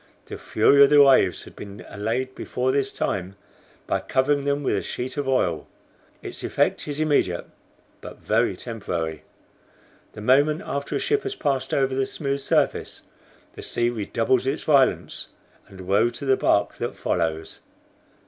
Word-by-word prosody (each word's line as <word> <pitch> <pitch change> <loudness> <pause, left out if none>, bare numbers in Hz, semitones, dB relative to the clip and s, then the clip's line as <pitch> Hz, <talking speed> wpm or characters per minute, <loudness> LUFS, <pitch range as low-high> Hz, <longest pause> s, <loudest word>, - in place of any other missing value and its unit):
The - - -8
fury 140 0 +5
of 140 - +6
the 145 -1 +7
waves 130 -9 +4
had - - -14
been 100 +1 -10
allayed 115 +6 -3
before 130 0 -2
this 135 0 0
time 95 0 -3 0.5
by - - 0
covering 140 +2 0
them 145 0 0
with 130 - +1
a 100 - 0
sheet 125 +1 -5
of 145 -2 -3
oil. 90 - 0 0.6
Its - - -7
effect - - 0
is 145 0 -4
immediate, 145 - +1 0.6
but - - -10
very - - 0
temporary. 85 -9 -4 0.9
The 105 - -9
moment 145 +7 +3
after 140 0 -3
a - - 0
ship 430 0 +1
has 405 0 -4
passed 140 -3 -1
over 135 -1 +1
the 130 0 0
smooth 140 -2 -2
surface, 135 - 0 0.5
the - - -9
sea 120 0 0
redoubles 120 +3 0
its 140 +4 -1
violence, 140 -4 +2 0.4
and 95 -1 -12
woe 100 +5 +2
to 140 - -7
the 135 -1 +4
bark 100 -5 +1
that - - -4
follows. 80 -2 -2
130 Hz, 160 wpm, -24 LUFS, 100-140 Hz, 0.9 s, the